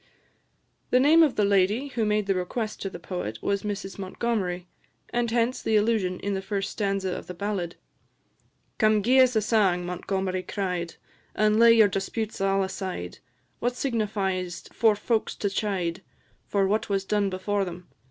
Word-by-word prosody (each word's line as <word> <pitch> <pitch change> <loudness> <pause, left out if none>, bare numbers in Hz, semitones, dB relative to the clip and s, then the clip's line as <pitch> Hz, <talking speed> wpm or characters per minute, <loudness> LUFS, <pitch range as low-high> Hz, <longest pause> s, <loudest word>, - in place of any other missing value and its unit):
The 250 - +4
name 305 +5 +6
of 305 -5 +4
the 210 - +2
lady 200 +7 +2
who 235 -4 -1
made 210 0 +1
the 195 - +2
request 210 +4 -3
to 195 - -2
the 180 - -8
poet 170 - -5
was 200 -1 0
Mrs 200 -2 -5
Montgomery, 190 -2 -2 0.5
and 240 0 0
hence 235 +2 +1
the 220 - +1
allusion 210 -4 +1
in 200 +1 -2
the 190 - -2
first 195 0 -3
stanza 195 -3 -1
of - - -8
the 180 - -7
ballad: 185 -2 -3 1.0
"Come 215 -2 +4
gie 255 +4 +4
's 255 -2 +5
a 215 - +2
sang, 195 -5 +2
Montgomery 185 +1 -2
cried, 180 -4 -3 0.4
And 215 0 +3
lay 230 0 +8
your 220 -2 +6
disputes 205 +2 -3
all 195 0 +2
aside; 190 - -5 0.4
What 245 +1 -1
signifies 195 -8 -2
't - - -17
for 220 -2 +4
folks 220 +2 -1
to 200 - -2
chide 190 -4 -2 0.5
For 200 -1 +2
what 215 +3 0
was 195 -1 0
done 205 0 +1
before 195 +2 -1
them? 180 -1 -7
200 Hz, 170 wpm, -26 LUFS, 185-220 Hz, 1.0 s, lay